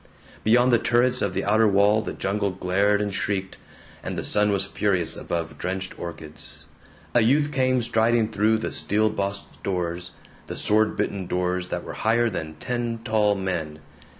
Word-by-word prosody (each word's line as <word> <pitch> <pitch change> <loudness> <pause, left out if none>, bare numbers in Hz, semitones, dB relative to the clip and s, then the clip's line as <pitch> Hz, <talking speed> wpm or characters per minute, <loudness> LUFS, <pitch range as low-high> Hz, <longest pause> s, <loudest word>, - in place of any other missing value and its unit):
Beyond 120 +3 +4
the 120 - +5
turrets 125 +2 +2
of 100 -3 -1
the 95 - -1
outer 110 +2 +4
wall 100 +2 +4
the - - -5
jungle 100 +1 -1
glared 95 +3 +1
and 100 -1 -3
shrieked, 95 -1 -2 0.4
and - - -5
the - - -2
sun 105 0 +2
was 100 -1 +1
furious 90 -5 +1
above 80 -3 -4
drenched 95 +1 -3
orchids. 80 -3 -7 0.5
A 120 - +5
youth 145 +6 +3
came 130 -3 +2
striding 115 -1 +2
through 110 +1 +2
the 110 - -3
steel 110 +1 +1
bossed 100 -1 -4
doors, 90 -2 -3 0.3
the - - -6
sword 110 0 +2
bitten 100 -3 -2
doors 90 0 -1
that - - -4
were - - -7
higher 115 +1 +1
than 80 -4 -5
ten 120 +5 -3
tall 105 -3 +2
men. 90 -6 -3
100 Hz, 170 wpm, -24 LUFS, 90-110 Hz, 0.5 s, the